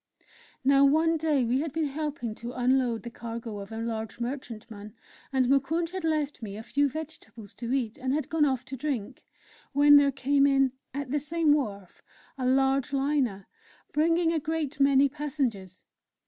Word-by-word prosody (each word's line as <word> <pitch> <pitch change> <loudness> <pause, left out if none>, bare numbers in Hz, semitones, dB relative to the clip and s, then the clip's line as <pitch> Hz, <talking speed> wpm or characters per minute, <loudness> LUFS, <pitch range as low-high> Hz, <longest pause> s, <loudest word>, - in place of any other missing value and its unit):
Now, 275 +1 +5
one 320 +4 +4
day 300 -5 +1
we 245 +3 +1
had 310 +1 -2
been 320 +2 -1
helping 285 -5 -3
to 235 +3 -7
unload 250 -2 +1
the 235 - -7
cargo 230 -2 -6
of 200 +2 -9
a 220 - -6
large 225 -1 -4
merchantman, 230 -4 -6 0.4
and 260 -1 +2
Moukounj 280 +6 +1
had 375 -1 -5
left 305 -4 -1
me 205 -2 -6
a 220 - -7
few 285 +4 +1
vegetables 275 -8 -9
to 235 +2 -5
eat, 245 -5 -1
and 260 0 -1
had 295 0 -1
gone 320 -1 +1
off 265 -4 +1
to 265 - -6
drink, 255 -6 -4 0.5
when 290 +1 +7
there 285 -1 +4
came 275 +1 +2
in, 270 -1 +3 0.2
at 280 -1 -5
the 295 - +1
same 310 +1 +2
wharf, 200 -10 -3 0.3
a 255 -2 -2
large 270 0 +2
Liner, 270 -8 0 0.4
bringing 330 +2 +2
a 320 - +1
great 305 -2 -3
many 275 0 +5
passengers. 265 - -4
270 Hz, 175 wpm, -28 LUFS, 235-295 Hz, 0.5 s, when